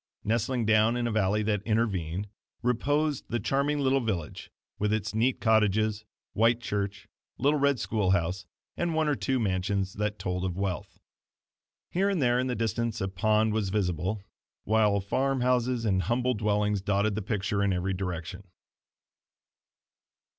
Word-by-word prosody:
Nestling 115 Hz, +2 st, 0 dB
down 110 Hz, +2 st, +4 dB
in 120 Hz, -, -1 dB
a 120 Hz, -, 0 dB
valley 105 Hz, 0 st, +1 dB
that 105 Hz, -2 st, 0 dB
intervened, 100 Hz, -5 st, -1 dB, 0.4 s
reposed 145 Hz, +4 st, 0 dB
the 120 Hz, -, -1 dB
charming 140 Hz, +6 st, 0 dB
little 135 Hz, 0 st, +3 dB
village 95 Hz, -9 st, -4 dB, 0.3 s
with 105 Hz, 0 st, +1 dB
its 110 Hz, -2 st, -1 dB
neat 120 Hz, +4 st, +1 dB
cottages, 110 Hz, -1 st, +2 dB, 0.3 s
white 115 Hz, +2 st, +3 dB
church, 100 Hz, -3 st, -3 dB, 0.3 s
little 145 Hz, +3 st, +2 dB
red 140 Hz, -2 st, +2 dB
school 105 Hz, -4 st, 0 dB
house 90 Hz, 0 st, 0 dB, 0.3 s
and 170 Hz, -2 st, -1 dB
one 160 Hz, -1 st, +2 dB
or 150 Hz, -, +2 dB
two 130 Hz, -1 st, 0 dB
mansions 95 Hz, -2 st, -1 dB
that 105 Hz, 0 st, -2 dB
told 90 Hz, -1 st, -3 dB
of 90 Hz, -1 st, -2 dB
wealth. 95 Hz, -2 st, -3 dB, 0.9 s
Here 195 Hz, +3 st, +2 dB
and 195 Hz, -3 st, 0 dB
there 120 Hz, -2 st, +3 dB
in 130 Hz, -, 0 dB
the 125 Hz, -, -1 dB
distance 115 Hz, +1 st, -1 dB
a 95 Hz, -, -1 dB
pond 110 Hz, +3 st, +2 dB
was 105 Hz, -3 st, 0 dB
visible; 95 Hz, 0 st, -1 dB, 0.4 s
while 105 Hz, -2 st, +3 dB
farm 130 Hz, +6 st, 0 dB
houses 125 Hz, -1 st, +1 dB
and 95 Hz, -3 st, +2 dB
humbler 120 Hz, +7 st, +1 dB
dwellings 105 Hz, -2 st, 0 dB
dotted 100 Hz, +1 st, +1 dB
the 110 Hz, -, -2 dB
picture 105 Hz, 0 st, -1 dB
in 100 Hz, -, +2 dB
every 95 Hz, +1 st, -1 dB
direction. 90 Hz, 0 st, -5 dB
110 Hz, 155 wpm, -28 LUFS, 100-120 Hz, 0.9 s, down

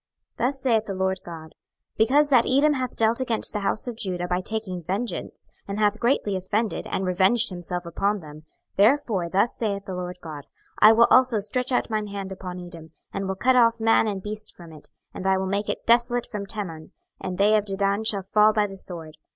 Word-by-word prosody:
26:025:012 -, -, +2 dB
Thus 270 Hz, 0 st, -4 dB
saith 225 Hz, -4 st, +2 dB
the 200 Hz, -, -4 dB
Lord 190 Hz, 0 st, -1 dB
GOD; 160 Hz, -2 st, -10 dB, 0.4 s
Because 280 Hz, +7 st, +4 dB
that 250 Hz, -4 st, +4 dB
Edom 285 Hz, +3 st, +4 dB
hath 255 Hz, -3 st, -3 dB
dealt 225 Hz, +2 st, +3 dB
against 235 Hz, -4 st, -1 dB
the 210 Hz, -, -1 dB
house 200 Hz, +1 st, -1 dB
of 240 Hz, -, -4 dB
Judah 180 Hz, -4 st, -3 dB
by 180 Hz, +1 st, -1 dB
taking 195 Hz, -3 st, -3 dB
vengeance, 195 Hz, +8 st, -4 dB, 0.2 s
and 200 Hz, 0 st, -4 dB
hath 210 Hz, 0 st, +2 dB
greatly 235 Hz, -5 st, +1 dB
offended, 205 Hz, +4 st, -2 dB
and 190 Hz, -, -2 dB
revenged 190 Hz, +6 st, +3 dB
himself 175 Hz, 0 st, -5 dB
upon 200 Hz, +5 st, -1 dB
them; 150 Hz, -3 st, -11 dB
26:025:013 -, -, -20 dB, 0.3 s
Therefore 205 Hz, -5 st, +2 dB
thus 200 Hz, +6 st, +1 dB
saith 200 Hz, -3 st, -3 dB
the 190 Hz, -, -6 dB
Lord 180 Hz, 0 st, -5 dB
GOD; 155 Hz, -4 st, -9 dB, 0.3 s
I 215 Hz, -, +8 dB
will 230 Hz, +1 st, +5 dB
also 255 Hz, -3 st, +5 dB
stretch 250 Hz, +6 st, -2 dB
out 245 Hz, -, 0 dB
mine 215 Hz, -1 st, -1 dB
hand 200 Hz, -1 st, -6 dB
upon 185 Hz, -1 st, -7 dB
Edom, 170 Hz, -2 st, -10 dB, 0.2 s
and 195 Hz, -1 st, -3 dB
will 190 Hz, -, -2 dB
cut 255 Hz, +6 st, +2 dB
off 230 Hz, -2 st, +4 dB
man 225 Hz, 0 st, +3 dB
and 195 Hz, -3 st, -3 dB
beast 215 Hz, 0 st, -6 dB
from 170 Hz, -2 st, -13 dB
it; 150 Hz, -, -13 dB, 0.2 s
and 190 Hz, -, -4 dB
I 190 Hz, 0 st, +3 dB
will 190 Hz, -, -2 dB
make 200 Hz, +2 st, -2 dB
it -, -, -4 dB
desolate 240 Hz, +1 st, +2 dB
from 205 Hz, -3 st, -6 dB
Teman; 180 Hz, -7 st, -5 dB, 0.3 s
and 185 Hz, -1 st, -5 dB
they 205 Hz, +3 st, +4 dB
of 210 Hz, -1 st, +1 dB
Dedan 200 Hz, +1 st, 0 dB
shall 200 Hz, -3 st, +1 dB
fall 210 Hz, +3 st, +4 dB
by 210 Hz, -1 st, +2 dB
the 195 Hz, -1 st, -8 dB
sword. 165 Hz, -5 st, -6 dB
200 Hz, 215 wpm, -24 LUFS, 185-225 Hz, 0.4 s, I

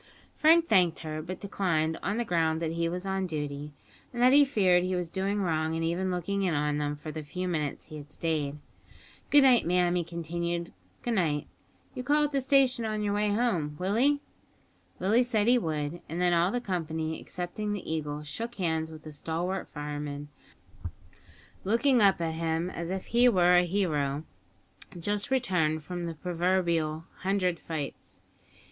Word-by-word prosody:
Frank 330 Hz, +2 st, +5 dB
thanked 180 Hz, -6 st, +4 dB
her, 155 Hz, -1 st, -4 dB
but 180 Hz, +3 st, -6 dB
declined, 165 Hz, -5 st, 0 dB
on 205 Hz, +3 st, -1 dB
the 240 Hz, -, -1 dB
ground 160 Hz, -4 st, +1 dB
that 165 Hz, -1 st, -2 dB
he 165 Hz, 0 st, -1 dB
was 180 Hz, +2 st, -4 dB
on 190 Hz, -1 st, -1 dB
duty, 145 Hz, -2 st, -4 dB, 0.4 s
and 240 Hz, -, -6 dB
that 255 Hz, +1 st, +6 dB
he 290 Hz, +1 st, +8 dB
feared 190 Hz, -10 st, +3 dB
he 185 Hz, 0 st, -1 dB
was 175 Hz, -2 st, -3 dB
doing 195 Hz, +2 st, -1 dB
wrong 160 Hz, -2 st, 0 dB
in 165 Hz, -, -1 dB
even 175 Hz, +3 st, 0 dB
looking 185 Hz, +2 st, -1 dB
in 180 Hz, -5 st, +1 dB
on 150 Hz, 0 st, 0 dB
them 145 Hz, 0 st, -1 dB
for 150 Hz, +1 st, -7 dB
the 155 Hz, -, -5 dB
few 180 Hz, +5 st, -4 dB
minutes 155 Hz, -5 st, -2 dB
he 155 Hz, -1 st, -9 dB
had 145 Hz, 0 st, -11 dB
stayed. 150 Hz, -3 st, -2 dB, 0.7 s
"Good 290 Hz, -1 st, +7 dB
night, 255 Hz, -3 st, +6 dB
ma'am," 175 Hz, 0 st, +2 dB
he 175 Hz, -1 st, +1 dB
continued, 170 Hz, +1 st, -4 dB, 0.3 s
"good 240 Hz, -, -1 dB
night. 155 Hz, -8 st, +1 dB, 0.5 s
You'll 255 Hz, -2 st, -6 dB
call 295 Hz, +2 st, +3 dB
at 295 Hz, -, 0 dB
the 275 Hz, -1 st, +1 dB
station 265 Hz, -2 st, +3 dB
on 215 Hz, -1 st, -2 dB
your 205 Hz, -1 st, 0 dB
way 210 Hz, 0 st, +1 dB
home, 205 Hz, -9 st, 0 dB
Willie?" 240 Hz, -, +2 dB, 0.8 s
Willie 210 Hz, +6 st, +3 dB
said 225 Hz, -4 st, +1 dB
he 245 Hz, +1 st, +5 dB
would, 155 Hz, -2 st, -3 dB
and 165 Hz, +3 st, -4 dB
then 180 Hz, -1 st, +3 dB
all 170 Hz, +1 st, +3 dB
the 245 Hz, -, -1 dB
company, 160 Hz, -6 st, -3 dB
excepting 180 Hz, +4 st, -4 dB
the 205 Hz, -3 st, -4 dB
Eagle, 150 Hz, -1 st, -3 dB
shook 230 Hz, +11 st, -5 dB
hands 160 Hz, -4 st, -1 dB
with 155 Hz, -1 st, -11 dB
the 155 Hz, -, -8 dB
stalwart 170 Hz, +5 st, -3 dB
fireman, 145 Hz, -1 st, -5 dB, 1.3 s
looking 235 Hz, +5 st, +3 dB
up 195 Hz, -3 st, +5 dB
at 165 Hz, -1 st, -1 dB
him 165 Hz, +2 st, -1 dB
as 170 Hz, -1 st, -5 dB
if 190 Hz, 0 st, -3 dB
he 240 Hz, +2 st, +4 dB
were 180 Hz, -4 st, +4 dB
a 180 Hz, 0 st, +5 dB
hero 155 Hz, -6 st, 0 dB, 0.8 s
just 205 Hz, +6 st, -1 dB
returned 180 Hz, -, +1 dB
from 175 Hz, +2 st, -5 dB
the 165 Hz, -1 st, -4 dB
proverbial 170 Hz, -2 st, 0 dB
"hundred 185 Hz, -2 st, 0 dB
fights." 155 Hz, -4 st, -6 dB
175 Hz, 180 wpm, -29 LUFS, 160-205 Hz, 1.3 s, he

